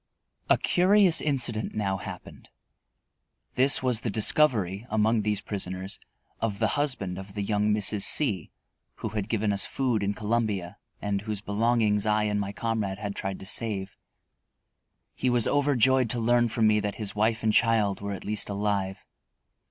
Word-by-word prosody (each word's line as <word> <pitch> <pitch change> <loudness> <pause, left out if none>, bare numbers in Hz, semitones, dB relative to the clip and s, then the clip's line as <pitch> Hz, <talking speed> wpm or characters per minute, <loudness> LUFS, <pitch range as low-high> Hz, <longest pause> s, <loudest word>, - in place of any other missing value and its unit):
A - - +5
curious 185 -1 +3
incident 120 -7 -1
now 100 -2 -1
happened. - - -10 1.0
This 135 +1 +5
was 125 -3 +2
the 115 - -2
discovery, 105 - +2
among 110 +1 +1
these 105 -1 -1
prisoners, 95 -1 -5 0.4
of 105 -3 -2
the - - +1
husband 125 -11 -2
of 95 +1 -11
the 100 - -2
young 105 +1 0
Mrs. 105 0 +2
C 100 - +3 0.5
who 110 - -5
had 105 0 -4
given 110 -2 0
us 100 - 0
food 125 -5 -1
in 100 0 -1
Columbia 105 -4 -2 0.2
and 100 -1 -1
whose 105 -1 -4
belongings 110 0 +1
I 105 0 +2
and 105 -1 -1
my 100 -1 -3
comrade 105 -3 -3
had 100 -1 -5
tried 95 -1 -4
to - - -9
save. 100 -2 -1 1.2
He 130 - -1
was 120 -2 +2
overjoyed 130 -3 +2
to 120 - -1
learn 120 +1 +2
from 110 0 0
me 105 0 +4
that 105 -1 -3
his 105 -3 -4
wife 110 +2 0
and 110 -1 +2
child 110 -4 +2
were 100 0 -4
at 95 - -8
least 105 0 -1
alive. 100 -1 -2
105 Hz, 165 wpm, -26 LUFS, 100-115 Hz, 1.2 s, A